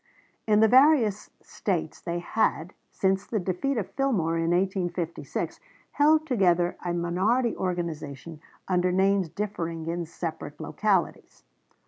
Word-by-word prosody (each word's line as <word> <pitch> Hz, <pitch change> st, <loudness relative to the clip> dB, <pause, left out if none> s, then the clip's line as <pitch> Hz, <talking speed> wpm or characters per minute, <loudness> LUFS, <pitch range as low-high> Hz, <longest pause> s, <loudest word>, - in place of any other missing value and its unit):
In 210 Hz, 0 st, +4 dB
the 220 Hz, -, +7 dB
various 250 Hz, -5 st, +4 dB
States 175 Hz, -6 st, -3 dB
they 170 Hz, 0 st, -3 dB
had, 175 Hz, -2 st, -1 dB, 0.2 s
since 190 Hz, 0 st, 0 dB
the 220 Hz, -, -1 dB
defeat 190 Hz, +9 st, -1 dB
of 195 Hz, -3 st, -3 dB
Fillmore 200 Hz, -13 st, 0 dB
in 165 Hz, 0 st, 0 dB
1856, 175 Hz, -2 st, -2 dB, 0.3 s
held 310 Hz, +2 st, +4 dB
together 180 Hz, -, +2 dB
a 175 Hz, -, -2 dB
minority 185 Hz, +8 st, +1 dB
organization 165 Hz, -4 st, -4 dB, 0.3 s
under 180 Hz, -1 st, +1 dB
names 190 Hz, -1 st, +2 dB
differing 170 Hz, -5 st, -4 dB
in 170 Hz, 0 st, -3 dB
separate 165 Hz, 0 st, -6 dB
localities. -, -, -1 dB
185 Hz, 120 wpm, -26 LUFS, 170-215 Hz, 0.3 s, the